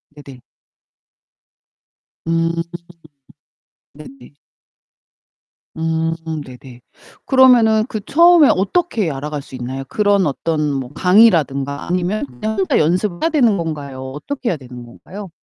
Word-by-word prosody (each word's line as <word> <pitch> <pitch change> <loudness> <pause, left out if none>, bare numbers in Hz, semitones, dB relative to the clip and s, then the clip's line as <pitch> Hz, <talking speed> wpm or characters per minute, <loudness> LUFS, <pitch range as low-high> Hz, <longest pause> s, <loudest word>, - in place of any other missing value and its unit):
네네. 140 -4 -13 1.8
음. 165 0 0 1.4
네네. 155 - -14 1.4
음 160 0 -1 0.3
네네. 125 -1 -13 0.5
그러면은 240 -5 +5
그 220 -4 -5
처음에 335 -1 +5
어떻게 210 - 0
알아갈 145 +1 -5
수 135 - -18
있나요? 130 +2 -5
그런 205 -2 +2
어떤 150 +1 -1
뭐 130 -2 -4
강의라든가 160 -9 +3
아니면 180 +3 -1
그냥 215 - -5
혼자 190 -1 +1
연습을 175 +3 0
해야 325 - +3
되는 245 -10 +2
건가요, 140 -6 -6
어떻게 240 - -5
해야 170 - -1
되는 125 -2 -11
건가요? 190 +11 -11
165 Hz, 245 characters per minute, -18 LUFS, 140-215 Hz, 1.8 s, 그러면은